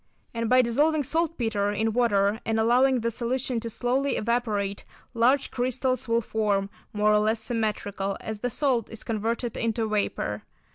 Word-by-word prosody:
And 230 -1 -2
by 255 0 +6
dissolving 295 +6 +2
saltpetre 245 -10 0
in 220 +1 0
water 210 -3 +2
and 225 0 0
allowing 250 +3 +3
the 230 +1 0
solution 245 +1 -1
to 230 0 -5
slowly 255 +5 0
evaporate, 215 -4 -1 0.3
large 255 +4 +2
crystals 255 +1 -1
will 230 0 +2
form, 205 -3 -1 0.2
more 210 0 +2
or 210 - +5
less 215 +1 +1
symmetrical, 210 -4 -2
as 220 -1 -6
the 245 - -1
salt 250 -3 0
is 225 - -7
converted 230 +2 -2
into 225 -1 -1
vapour. 200 - -1
230 Hz, 155 wpm, -26 LUFS, 210-250 Hz, 0.3 s, by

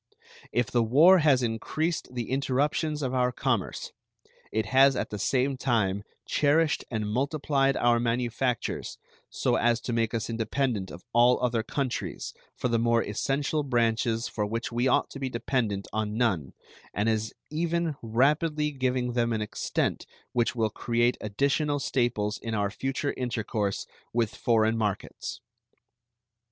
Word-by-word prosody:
If 120 -4 0
the 120 - +3
war 155 +12 +6
has 140 -5 +4
increased 125 +5 -2
the 120 -1 -3
interruptions 145 +3 0
of 130 -1 -1
our 125 -1 +2
commerce, 120 -5 -2 0.6
it 110 +1 0
has 135 +4 +5
at - - -3
the 105 - -4
same 130 +5 +1
time 110 -7 +1 0.2
cherished 150 +2 +2
and 110 -2 -2
multiplied 135 +3 +1
our 120 0 +3
manufactures 120 +1 -1 0.3
so - - +1
as 120 0 +2
to 120 - -3
make 115 -1 0
us 115 - -2
independent 115 -2 -1
of 90 - -10
all 120 +1 +5
other 120 -2 +1
countries 130 +2 -3 0.2
for - - -1
the 115 -1 +1
more 115 0 +3
essential 140 +8 -1
branches 115 -3 +1
for 105 - -3
which 115 +4 -3
we 120 +2 +1
ought 130 - +2
to 140 - -8
be 135 -1 -2
dependent 115 -5 -1
on 110 0 -2
none, 95 - 0 0.4
and 105 +3 +1
is 110 -1 0 0.2
even 170 0 0
rapidly 150 +6 +1
giving 130 -2 -1
them 120 -1 +1
an 110 -1 0
extent 105 - -2 0.3
which 120 -1 +1
will 110 -2 +1
create 120 +2 +1
additional 140 +7 0
staples 120 -6 0
in 115 -1 -4
our 100 -1 0
future 135 +5 -2
intercourse 110 -5 -2 0.3
with 115 -2 +1
foreign 110 -1 +2
markets. 105 -4 -3
120 Hz, 145 wpm, -27 LUFS, 110-135 Hz, 0.6 s, war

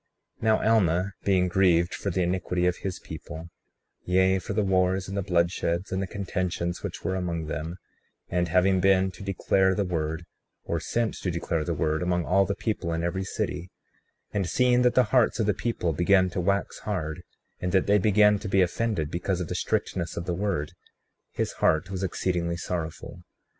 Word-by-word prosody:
35:15 - - -12
Now 110 -1 +3
Alma, 95 -2 +2
being 95 -2 +3
grieved 90 -1 +3
for 100 - -3
the 90 0 0
iniquity 90 0 0
of 90 -1 +1
his 95 -2 -4
people, 80 +2 -9 0.5
yea 95 +1 +3
for 95 - -5
the 105 +1 +1
wars, 95 0 +1
and 95 - -5
the 100 - 0
bloodsheds, 85 0 0
and 95 +1 -1
the 95 - -2
contentions 90 -3 -3
which - - -6
were 95 - -1
among 85 -3 -2
them; 75 +3 -4 0.5
and 90 -1 0
having 95 +3 +3
been 95 0 +3
to - - -13
declare 95 -1 +2
the 100 - 0
word, 80 -1 -2 0.4
or - - -2
sent 115 -2 -1
to 95 - -2
declare 85 -2 -1
the 85 +1 -2
word, 80 +1 0
among 90 -1 0
all 95 +2 +3
the 100 - -1
people 105 -6 -2
in 80 0 -2
every 95 +2 -1
city; 90 -3 -3 0.6
and 100 -4 -1
seeing 125 -1 +3
that 125 -1 +3
the 125 - +6
hearts 125 -2 +4
of 110 - +2
the 105 - +2
people 90 -5 -1
began 95 +3 +3
to 90 - -2
wax 100 +2 0
hard, 90 -6 -3 0.4
and 90 - -2
that 95 0 +3
they 100 +1 +4
began 105 +1 +4
to 105 - -6
be 95 -1 +4
offended 90 -4 -1
because 90 +1 -1
of 90 - -4
the - - -2
strictness 85 -2 -2
of 85 - -3
the 90 - -1
word, 90 -5 -1 0.6
his - - -2
heart 80 +4 +2
was 95 -1 -3
exceedingly 85 -2 -1
sorrowful. 85 0 -5
90 Hz, 195 wpm, -27 LUFS, 85-100 Hz, 0.6 s, the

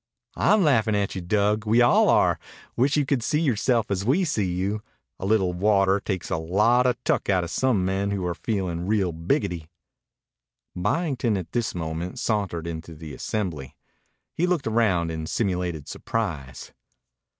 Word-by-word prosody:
"I'm 205 +1 +3
laughin' 115 -8 +3
at 100 -1 0
you, 95 - -4
Dug. 105 +4 +1
We 115 +3 +4
all 120 0 +5
are. - - +3 0.4
Wish 135 +5 +2
you 145 - +2
could 135 -2 0
see 150 +6 0
yoreself 120 -6 +1
as 95 -1 0
we 140 - +2
see 105 - 0
you. 95 +4 -2 0.4
A 95 - -3
little 95 -4 +2
water 100 +1 +3
takes 95 -3 -4
a - - +1
lot 105 +10 +3
o' 125 - +2
tuck - - 0
outa 90 -3 +2
some 115 -3 +1
men 95 +2 0
who 100 -3 -2
are 90 - -1
feelin' 90 -3 -3
real 100 -4 +1
biggity." 85 - -1 1.1
Byington, 125 - 0
at 90 - -6
this 120 -5 -1
moment, 85 +1 -4
sauntered 100 -7 -1
into 80 -1 -6
the 75 -2 -9
assembly. 85 - -4 0.6
He 175 - 0
looked 175 -5 0
around 105 -7 +1
in 80 -1 -4
simulated 90 -8 -2
surprise. 75 - -4
100 Hz, 160 wpm, -25 LUFS, 90-115 Hz, 1.1 s, all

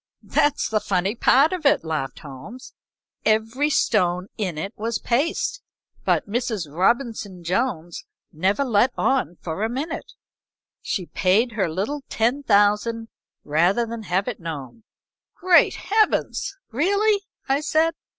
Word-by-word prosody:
"That's 290 -1 +1
the 215 - +1
funny 195 -1 0
part 275 +6 +4
of 360 -3 -4
it," 280 - +3
laughed 155 -4 -3
Holmes. 150 - -10 0.5
"Every 225 +7 +1
stone 185 -9 +1
in 185 -7 -3
it 175 +6 -4
was 225 +1 -2
paste, 365 - -1 0.4
but - - +1
Mrs. 220 -4 -2
Robinson 205 -2 0
Jones 175 -3 -2 0.3
never 190 - +1
let 240 0 +3
on 265 -9 +1
for 165 +3 -4
a 220 - +1
minute. 275 +7 -5 0.7
She 185 - -3
paid 205 +8 +2
her 205 -5 -1
little 205 - -3
ten 240 +6 +1
thousand 225 0 +2 0.3
rather 175 +10 +2
than 230 0 -6
have 195 -1 -1
it 245 - -4
known." 160 - -7 0.5
"Great 360 -1 +4
Heavens! 425 +3 0
really?" 400 - +2 0.3
I 270 +1 +2
said. 320 +1 +2
225 Hz, 130 wpm, -23 LUFS, 185-270 Hz, 0.7 s, part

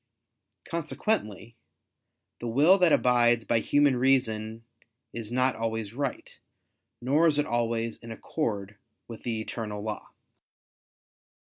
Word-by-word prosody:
Consequently 135 - -2 0.8
the 120 - -5
will 150 +12 +5
that 180 -3 +4
abides 120 -3 +3
by 115 - +2
human 145 +3 +3
reason, 115 -4 +1 0.5
is 115 -1 -6
not 130 0 +2
always 110 -2 -3
right, 140 0 -4 0.6
nor 145 +6 +3
is 150 -2 +2
it 145 - +2
always 115 -1 -1
in 115 - -11
accord 105 -5 -4 0.3
with 115 -2 -9
the 115 -2 -3
eternal 105 -2 -5
law. 105 -1 -5
120 Hz, 115 wpm, -27 LUFS, 110-135 Hz, 0.8 s, will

